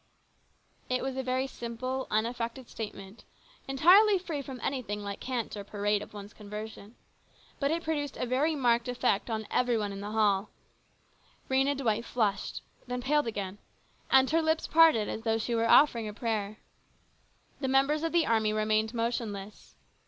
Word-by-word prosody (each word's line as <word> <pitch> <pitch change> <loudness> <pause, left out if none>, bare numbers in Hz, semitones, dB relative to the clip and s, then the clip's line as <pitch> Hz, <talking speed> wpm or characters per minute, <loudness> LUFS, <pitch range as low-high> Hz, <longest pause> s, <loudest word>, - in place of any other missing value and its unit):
It 255 0 0
was 265 -1 -3
a 265 - -1
very 260 +1 0
simple, 255 +1 -4
unaffected 235 +3 -2
statement, 205 -1 -8 0.4
entirely 375 +10 +6
free 335 -6 -4
from 265 -2 -8
anything 225 -7 -2
like 200 0 -5
cant 245 -5 -3
or 205 - -6
parade 205 0 -1
of - - -9
one's 205 0 -10
conversion. 210 +1 -9 0.6
But 280 - +1
it 335 +2 -1
produced 290 -3 -2
a - - -1
very 275 +6 +1
marked 240 -3 +2
effect 245 -3 0
upon 220 -1 -2
every 245 -2 +2
one 205 -2 -2
in 195 - -7
the 205 - -5
hall. 210 -2 +2 1.0
Rhena 270 +1 +2
Dwight 230 -4 0
flushed, 210 -5 -1 0.2
then 250 0 -3
paled 295 0 +2
again, 200 -3 -4 0.5
and 265 0 +6
her 330 +1 +3
lips 320 0 +1
parted 320 -10 +5
as 220 - -4
though 225 -1 +1
she 225 +2 -2
were 230 0 +1
offering 235 -7 +5
a 210 - -7
prayer. 215 -3 -2 1.0
The 270 - -2
members 275 +3 +3
of 330 0 -1
the 340 -1 +3
army 220 -2 +2
remained 215 +1 +1
motionless. 220 -3 -4
235 Hz, 165 wpm, -29 LUFS, 215-270 Hz, 1.0 s, entirely